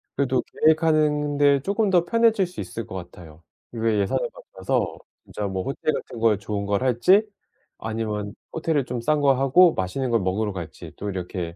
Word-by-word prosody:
그래도 130 -2 +1
계획하는 155 -2 +2
데 140 -1 +4
쪼끔 200 +5 0
더 175 -2 +3
편해질 225 -3 +3
수 180 - -7
있을 115 -3 -6
것 95 - -8
같아요. 85 -3 -10 0.3
이게 115 -2 0
예산을 100 - 0
맞춰서 - - -3 0.3
진짜 105 - -4
뭐 95 -1 -3
호텔 140 +3 -2
같은 120 - -6
거에 110 -2 +3
좋은 100 0 -4
걸 100 +2 0
할지 130 - +4 0.5
아니면 105 -2 -4 0.2
호텔을 160 -4 0
좀 125 -1 -4
싼 150 +5 +1
거 140 -1 +4
하고 135 +7 +5
맛있는 105 +8 -2
걸 115 -2 +2
먹으러 100 +2 -1
갈지 85 -4 -8
또 105 - -5
이렇게 90 -2 -5
120 Hz, 350 characters per minute, -24 LUFS, 100-155 Hz, 0.5 s, 하고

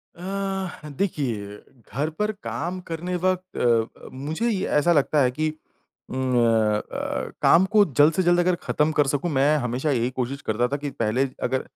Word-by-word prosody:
अ, 190 -3 -4
देखिए, 115 - -2 0.4
घर 145 +6 0
पर 210 +1 +1
काम 175 +5 -3
करने 175 +2 -3
वक़्त 185 +1 -1
अ - - -1 0.4
अ, - - -9
मुझे 155 - -2
ये 200 -4 -1
ऐसा 170 +4 +4
लगता 150 0 +3
है 125 -2 +3
कि 155 +5 -1 0.6
उम, 130 0 -1
अ 110 -3 +3
अ, - - -3
काम 180 +3 +6
को 210 - +8
जल्द 150 +1 +4
से 185 - +1
जल्द 175 0 +4
अगर 180 0 +3
ख़त्म 150 +1 +1
कर 145 - +4
सकूँ, 145 +5 0
मैं 145 +2 +3
हमेशा 130 +3 -1
यही 120 -2 +1
कोशिश 130 +2 -4
करता 110 +3 0
था 140 +3 -2
कि 145 0 -4
पहले 125 +2 0 0.2
अगर 130 +1 0
150 Hz, 185 wpm, -24 LUFS, 125-175 Hz, 0.6 s, को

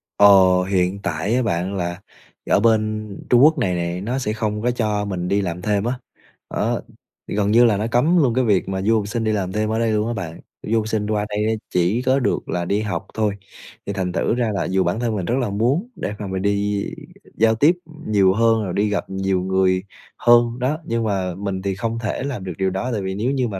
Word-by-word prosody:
Ờ, 100 - +7 0.4
hiện 95 0 0
tại 100 +4 -1
á 130 - +2
bạn 95 -2 -1
là 85 0 -3 0.5
ở - - +4
bên 110 -1 +1 0.2
Trung 125 +1 +6
Quốc 155 +2 +6
này 95 -9 0
nè, 85 +1 -2
nó 120 +6 -2
sẽ 105 -5 -2
không 105 -1 -2
có 125 +2 +1
cho 105 -4 -1
mình 90 -3 -3
đi 100 +2 +1
làm 90 -2 -4
thêm 100 0 0
á, 120 +2 0 0.6
đó. - - 0 0.5
Thì - - -4
gần 105 0 +1
như 120 +2 +6
là 110 -4 +3
nó 105 +3 -1
cấm 150 +10 +3
luôn 135 -8 +3
cái 130 +2 +2
việc 100 -6 +1
mà 95 0 -2
du 110 +4 +2
học 105 -2 -2
sinh 115 +2 -2
đi 110 - +1
làm 95 -3 -1
thêm 105 +2 -1
ở 110 +1 0
đây 115 -1 +1
luôn 105 0 +1
á 120 - -1
bạn, 85 -6 -6 0.2
du 115 +2 0
học 110 - -3
sinh 110 -2 -1
qua 105 -1 0
đây 105 0 -1
á, - - +2 0.2
chỉ 90 +7 +2
có 130 +1 +2
được 130 - -1
là 90 -1 -1
đi 100 +4 0
học 105 -1 -3
thôi, 110 -2 0 0.5
thì 100 - -3
thành 95 -2 -2
thử 95 - 0
ra 120 -2 0
là 100 - -1
dù 95 0 +1
bản 90 +5 -1
thân 115 -2 -1
mình 95 -4 -2
rất 120 - 0
là 120 - -1
muốn 125 - 0
để 100 - -4
mà 105 - -4
mình 95 0 -3
đi 100 0 0 0.5
giao 115 0 +3
tiếp 150 +9 +4 0.3
nhiều 100 -3 +4
hơn, 115 +1 +3
rồi 95 -3 -4
đi 105 +1 +1
gặp 105 - -2
nhiều 95 -1 -1
người 95 0 +1 0.3
hơn, 120 0 +4
đó, 130 +5 0
nhưng 115 0 -1
mà 95 -4 -1
mình 95 0 -4
thì 95 0 -2
không 115 +3 -3
thể 115 +2 -3
làm 135 -8 -4
được 90 -1 -5
điều 95 0 +1
đó, 95 +7 -3
tại 110 -4 -2
vì 95 0 -3
nếu 115 +6 0
như 130 -3 0
mà 100 -4 -5
105 Hz, 250 wpm, -21 LUFS, 95-115 Hz, 0.6 s, Ờ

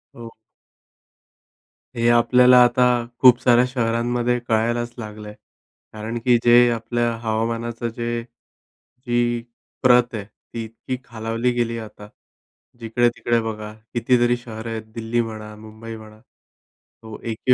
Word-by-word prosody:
हो. 115 -1 -10 1.6
हे 115 0 +1
आपल्याला 125 +1 +5
आता 120 +1 +3 0.4
खूप 125 -2 +7
साऱ्या 120 0 +4
शहरांमध्ये 120 0 0
कळायलाच 120 +2 0
लागलंय. 105 -2 -8 0.6
कारण 110 +2 -5
की 125 -1 +5
जे 120 0 +6
आपल्या 120 +1 -1
हवामानाचं 115 +1 -2
जे 120 0 -3
जी 120 0 -5 0.4
प्रत 125 -1 +4
आहे 105 -3 -5
ती 115 +2 -9
इतकी 115 +3 -6
खालावली 115 0 -2
गेली 120 -1 -1
आहे 115 - -6
आता. 105 -1 -13 0.7
जिकडे-तिकडे 120 0 +1
बघा 110 -1 -6 0.2
कितीतरी 120 +1 +2
शहरं 115 -1 -8
आहेत. 110 -1 -4
दिल्ली 115 +1 -1
म्हणा 110 -2 -7
मुंबई 110 +1 -10
म्हणा 110 -1 -13
तो 110 -2 -18
A. 115 - -2
Q. 125 +3 +2
115 Hz, 125 wpm, -22 LUFS, 110-120 Hz, 1.6 s, खूप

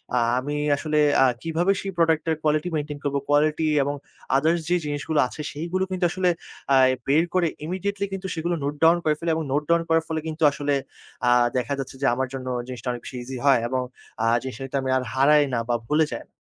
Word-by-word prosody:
আ - - +3 0.2
আমি 145 +3 -4 0.2
আসলে 150 0 -1 0.3
আ - - +6 0.2
কিভাবে 165 +4 +1
সেই 195 - -4
প্রোডাক্টটার 160 -1 +2
কোয়ালিটি 155 +3 +1
মেইনটেইন 150 -1 -3
করব, 140 -1 -1
কোয়ালিটি 155 +2 +2 0.2
এবং 145 +1 -2 0.4
আদারস 160 +4 +2
যে 180 - +3
জিনিসগুলো 145 +1 -1
আছে 150 - -8
সেইগুলো 170 +5 -2
কিন্তু 185 -1 0
আসলে 185 -1 +1 0.4
আ - - +6 0.3
বের 150 +4 +4
করে 180 -2 +3 0.2
ইমিডিয়েটলি 200 +3 -2
কিন্তু 190 0 -4
সেগুলো 170 +2 -1
নোট 145 +1 -1
ডাউন 165 +2 +6
করে 155 - +3
ফেলি 170 -1 -1
এবং 160 - -2
নোট 150 +1 +1
ডাউন 170 0 +4
করার 165 0 +3
ফলে 160 -1 -2
কিন্তু 160 0 -3
আসলে 145 0 -1 0.5
আ - - +5 0.3
দেখা 125 +3 -1
যাচ্ছে 135 0 -6
যে - - +1
আমার 130 0 -1
জন্য 130 -1 -6 0.2
জিনিসটা 125 0 -7
অনেক 120 -1 -6
বেশি 125 - -7
ইজি 130 +1 -6
হয় 135 -4 +6
এবং 130 +1 -1 0.4
আ - - +2 0.2
জিনিসটা 130 -1 -7
কিন্তু 140 +1 -3
আমি 130 - -3
আর 130 - -1
হারাই 145 +3 +5
না 115 - +1
বা 120 - +2
ভুলে 155 +1 +3
যাই - - -7
150 Hz, 210 wpm, -24 LUFS, 140-165 Hz, 0.5 s, আ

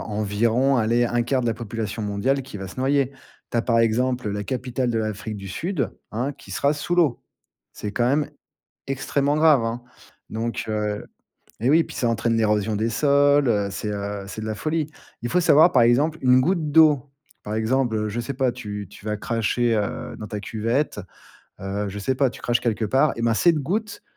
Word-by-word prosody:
environ, 110 +5 +1
allez, 115 +2 +2
1/4 120 +2 0
de 120 - -1
la 115 - +1
population 115 -1 -5
mondiale 105 +7 0
qui 125 -5 -9
va 95 - -6
se - - -12
noyer. 135 0 +1 0.4
Tu - - -2
as, 115 - +1
par 115 -2 +2
exemple, 125 0 +1
la 105 0 -3
capitale 125 +1 -2
de 115 - 0
l'Afrique 110 0 -3
du 100 -1 -8
Sud, 165 - -2 0.2
hein, 125 +6 -2
qui - - -16
sera 140 - +1
sous 150 +4 -2
l'eau. 160 -8 +2 0.5
C'est 105 - -5
quand 120 +1 +1
même 145 +2 +1 0.6
extrêmement 140 +1 0
grave, 155 -6 +5
hein. 115 +2 -3 0.5
Donc, 115 +1 -3
heu 105 -1 -2 0.6
eh 120 - +2
oui, 165 +1 +5
puis - - -11
ça 120 - 0
entraîne 115 0 +1
l'érosion 105 -1 +1
des 110 +2 0
sols, 145 +3 +3
heu, 100 -2 +1
c'est, 105 - -4
heu, 100 -1 -4
c'est 110 - -7
de - - -4
la 110 - -2
folie. 155 +5 -1 0.4
Il 120 - -2
faut 180 - +2
savoir, 165 +1 +6
par 125 - +5
exemple, 140 +7 +3
une 125 0 +5
goutte 160 0 0
d'eau. 150 -4 +5 0.3
Par 105 +1 -4
exemple, 115 +2 +1
heu, 105 0 -1
je 115 - -3
sais 120 +4 -3
pas, 130 -1 +1
tu 105 -3 -6
tu - - -15
vas 105 0 -2
cracher, 115 +2 0
heu, 105 -2 -3
dans 105 - -6
ta 105 -2 -5
cuvette, 115 +4 -1 0.6
heu, 100 +2 -3
je 100 +1 -6
sais 130 +6 0
pas, 135 +1 +2
tu - - -12
craches 120 0 +1
quelque 110 -2 -1
part, 135 +7 +3
eh 115 - -4
ben 115 0 +3
cette 170 +5 +3
goutte, 205 +9 -3
120 Hz, 205 wpm, -23 LUFS, 105-140 Hz, 0.6 s, savoir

